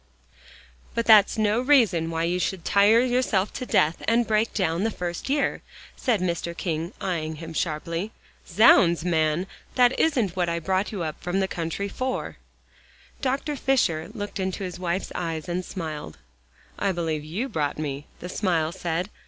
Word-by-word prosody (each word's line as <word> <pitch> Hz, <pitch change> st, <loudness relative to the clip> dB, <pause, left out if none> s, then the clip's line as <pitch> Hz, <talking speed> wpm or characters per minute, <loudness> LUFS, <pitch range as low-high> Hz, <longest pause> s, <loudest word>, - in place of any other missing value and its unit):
"But 230 Hz, -, 0 dB
that's 215 Hz, -2 st, +6 dB
no 215 Hz, +2 st, +2 dB
reason 225 Hz, -, +3 dB
why 165 Hz, 0 st, -1 dB
you 175 Hz, +2 st, 0 dB
should 180 Hz, -2 st, -2 dB
tire 205 Hz, +3 st, +5 dB
yourself 245 Hz, -6 st, +1 dB
to 255 Hz, -, -5 dB
death, 155 Hz, +2 st, +3 dB
and 235 Hz, +1 st, +3 dB
break 220 Hz, +1 st, +1 dB
down 175 Hz, -2 st, 0 dB
the 225 Hz, -, +2 dB
first 175 Hz, +1 st, -5 dB
year," 285 Hz, 0 st, 0 dB, 0.3 s
said 225 Hz, -7 st, 0 dB
Mr. 170 Hz, -1 st, -2 dB
King, 165 Hz, 0 st, -2 dB
eyeing 160 Hz, -4 st, -2 dB
him 165 Hz, +1 st, -8 dB
sharply. 165 Hz, +5 st, -2 dB, 0.4 s
"Zounds, 170 Hz, -3 st, +5 dB
man, 160 Hz, 0 st, +1 dB, 0.3 s
that 250 Hz, 0 st, +4 dB
isn't 240 Hz, -, +2 dB
what 175 Hz, -2 st, 0 dB
I 170 Hz, -, -1 dB
brought 190 Hz, +4 st, -1 dB
you 195 Hz, -5 st, -3 dB
up 155 Hz, -1 st, -5 dB
from 180 Hz, +2 st, -1 dB
the 190 Hz, -, +1 dB
country 170 Hz, +3 st, -3 dB
for." 255 Hz, +5 st, -3 dB, 0.8 s
Dr. 275 Hz, +2 st, -1 dB
Fisher 205 Hz, -, +1 dB
looked 205 Hz, -3 st, -6 dB
into 190 Hz, +1 st, -2 dB
his 180 Hz, -1 st, -5 dB
wife's 180 Hz, +1 st, -2 dB
eyes 165 Hz, -3 st, -3 dB
and 180 Hz, +1 st, -2 dB
smiled. 160 Hz, -5 st, -6 dB, 0.6 s
"I 200 Hz, -, +1 dB
believe 165 Hz, -4 st, -2 dB
you 185 Hz, -, -3 dB
brought 150 Hz, -, -2 dB
me," 145 Hz, -1 st, -4 dB
the 180 Hz, -, -5 dB
smile 170 Hz, -5 st, 0 dB
said. 175 Hz, +2 st, -3 dB
180 Hz, 165 wpm, -25 LUFS, 165-215 Hz, 0.8 s, that's